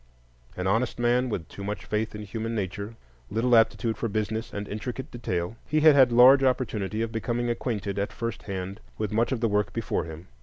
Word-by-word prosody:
An 90 - -2
honest 115 +6 +1
man, 120 +1 +2
with 90 -7 -3
too 100 - -9
much 105 +1 -4
faith 105 0 -2
in 105 - -6
human 115 +3 -4
nature, 100 +2 -4 0.3
little 120 +3 +2
aptitude 115 0 +3
for 115 - -1
business 110 +2 -2
and 100 0 -5
intricate 125 +5 -5
detail, 100 -3 -3
he 155 +1 +1
had 155 -1 +8
had 130 -3 +6
large 130 +3 +7
opportunity 115 -5 0
of 115 - -3
becoming 120 +1 -1
acquainted 105 -5 -2
at 100 - -1
first 115 -1 -4
hand 95 +1 -4 0.2
with 110 -2 -2
much 115 +4 +1
of 125 -4 -1
the 115 - +3
work 105 -1 0
before 115 - -1
him. 80 +1 -9
110 Hz, 200 wpm, -27 LUFS, 100-120 Hz, 0.3 s, had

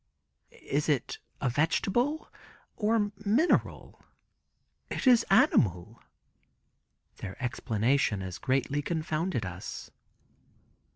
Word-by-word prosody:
"Is 145 +2 -3
it 140 -5 -1 0.2
a - - +1
vegetable 195 - 0 0.4
or 210 -1 +1
mineral?" 235 - +1 0.9
"It - - -4
is 245 -3 +6
animal." 115 - +3 1.2
Their 95 - -7
explanation 115 -3 0
as 95 -1 -6
greatly 135 +2 0
confounded 155 - -2
us. 90 0 -7
145 Hz, 80 wpm, -29 LUFS, -, 1.2 s, is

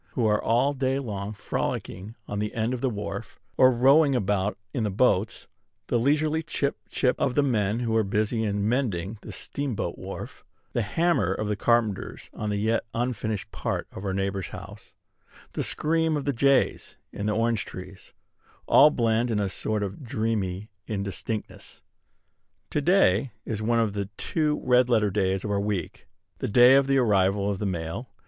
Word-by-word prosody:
who 120 - 0
are 105 -1 +2
all 125 +5 +2
day 135 -1 0
long 105 -6 -4
frolicking 100 0 -4
on 105 - -3
the 105 +3 -3
end 115 +2 0
of 125 - -4
the 130 - +1
wharf, 100 -1 -6 0.2
or 130 0 +6
rowing 135 +4 +5
about 100 -2 0 0.2
in 120 - -1
the 105 - 0
boats; 105 0 +1 0.4
the 120 - +2
leisurely 150 +5 +2
chip, 145 -3 -2
chip, 125 -2 +1
of 130 -3 0
the 145 - +4
men 110 -4 +1
who 115 -2 0
are 110 - +4
busy 110 +2 0
in 100 -1 0
mending 110 -5 -1
the - - -9
steamboat 140 -6 -4
wharf; - - -8 0.3
the 120 - +1
hammer 110 - +1
of 105 +2 -2
the 105 - 0
carpenters 110 -2 0
on 105 - -4
the 105 - -1
yet 110 +3 +1
unfinished 115 -4 -2
part - - -3
of 95 - -8
our 100 - -1
neighbor's 95 -1 -2
house; - - -11 0.6
the - - -2
scream 160 0 +1
of 145 - -4
the 140 - +1
jays 140 +2 +1
in 100 - -4
the 105 - +1
orange 115 -1 +1
trees, 95 +1 -10 0.5
all 150 - +7
blend 115 -3 +1
in 110 -2 0
a 100 - 0
sort 105 +2 -2
of 100 +8 -6
dreamy 110 -4 -2 0.2
indistinctness. 100 +1 -5 0.9
To 150 - 0
day 135 - +3
is 110 -2 -3
one 115 +2 +2
of 110 -3 +1
the 100 -1 -3
two 150 -2 0
red 125 0 +4
letter 105 -4 +3
days 95 -1 0
of 105 - -3
our 100 -1 +1
week, 100 -3 -3 0.3
the - - -2
day 125 +4 +7
of 135 0 +5
the 135 0 +3
arrival 100 -4 +2
of 95 - -4
the 105 - -1
mail. 85 +7 -4
110 Hz, 180 wpm, -26 LUFS, 100-130 Hz, 0.9 s, all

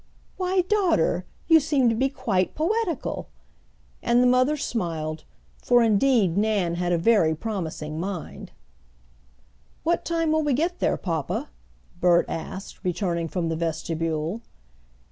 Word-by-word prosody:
"Why, 370 0 +1
daughter, 355 - +1 0.2
you 325 -1 +7
seem 285 -4 +2
to - - +2
be 265 +4 +1
quite 190 -8 -1
poetical!" 345 - -1 0.7
and 240 +1 +3
the - - +4
mother 255 +4 +3
smiled, 160 - -3 0.4
for 245 -1 +4
indeed 215 -4 +3
Nan 205 -5 +1
had 175 +1 -1
a 175 - +3
very 165 -4 +3
promising 160 -6 -4
mind. 185 -2 -6 1.3
"What 340 +2 +1
time 330 -2 0
will 315 0 +2
we 295 -2 +1
get 335 +7 0
there, - - +1
papa?" 165 - -3 0.5
Bert 175 -1 +4
asked, 190 +4 -7
returning 175 -2 -1
from 170 0 -2
the 165 - -1
vestibule. 165 +3 -2
205 Hz, 130 wpm, -25 LUFS, -, 1.3 s, you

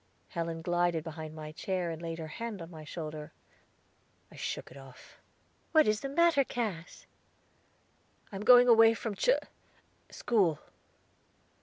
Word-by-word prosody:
Helen 165 -1 -4
glided 175 -2 +1
behind 160 -1 -7
my 155 -1 -7
chair, 180 +1 -3
and 165 0 -7
laid 165 -1 -5
her 160 - -6
hand 225 +5 -6
on 165 0 -9
my 160 -2 -10
shoulder; 155 0 -7 1.0
I - - -14
shook - - -5
it - - -13
off. 135 -2 -15 0.5
"What 310 -5 +6
is 215 0 +2
the 275 - -4
matter, 330 -1 +4
Cass?" 210 -10 -5 1.3
"I - - -8
am 195 - -5
going 245 +2 +8
away 225 -1 +7
from 225 -1 -4
Char - - +3 0.7
school." 190 -10 +1
175 Hz, 145 wpm, -30 LUFS, 160-225 Hz, 1.3 s, going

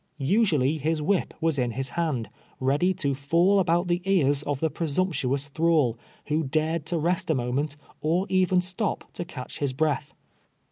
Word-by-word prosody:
Usually 155 - +2
his 155 +2 0
whip 180 +5 0
was 160 -4 +1
in 120 -2 0
his 135 +2 -2
hand, 145 -11 -2 0.3
ready 145 +8 +2
to 140 -6 0
fjill 170 +9 +3
about 175 0 +2
the 175 +1 0
ears 145 -8 +2
of 145 -2 -2
the 160 0 0
presumptuous 145 -4 -1
thrall, 155 -6 +2 0.3
who 155 +2 0
dared 155 +2 -1
to 170 - 0
rest 175 +2 0
a 160 - +3
moment, 135 +4 -1 0.2
or 170 +5 +1
even 185 -1 +3
stop 185 +4 -3
to - - -4
catch 130 -7 -8
his 140 -3 0
breath. 150 0 -1
155 Hz, 170 wpm, -26 LUFS, 140-175 Hz, 0.3 s, fjill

